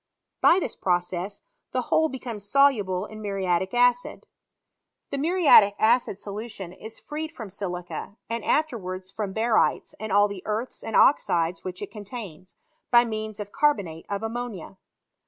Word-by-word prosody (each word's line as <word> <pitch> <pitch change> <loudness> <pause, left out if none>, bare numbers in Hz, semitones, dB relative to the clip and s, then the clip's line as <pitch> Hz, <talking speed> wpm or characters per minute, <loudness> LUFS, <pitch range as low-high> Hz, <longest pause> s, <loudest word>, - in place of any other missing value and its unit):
By 340 - +6
this 315 - -3
process, 180 +2 -2 0.3
the - - +1
whole 315 0 +2
becomes 240 -6 -6
soluble 210 -10 +3
in 215 0 -10
muriatic 190 -2 -1
acid. 245 0 +2 0.9
The 280 - -2
muriatic 300 - +6
acid 230 -3 +3
solution 205 -3 -6
is 220 +4 -9
freed 310 +1 -6
£rom 220 -5 -8
silica, 180 +1 -5
and 230 -1 -3
afterwards 190 -11 -1
from 210 -3 -4
barytes, 220 +2 +1
and 215 0 -5
all 205 +1 +5
the 200 -2 -7
earths 220 +4 -3
and 225 - -4
oxides 170 - +3
which 185 +1 -5
it 205 - -7
contains, 205 -5 -9 0.3
by 240 0 +6
means 215 -2 -5
of 205 -1 -6
carbonate 195 - 0
of. 200 +1 -3
ammonia. 225 -5 -5
210 Hz, 145 wpm, -25 LUFS, 190-240 Hz, 0.9 s, By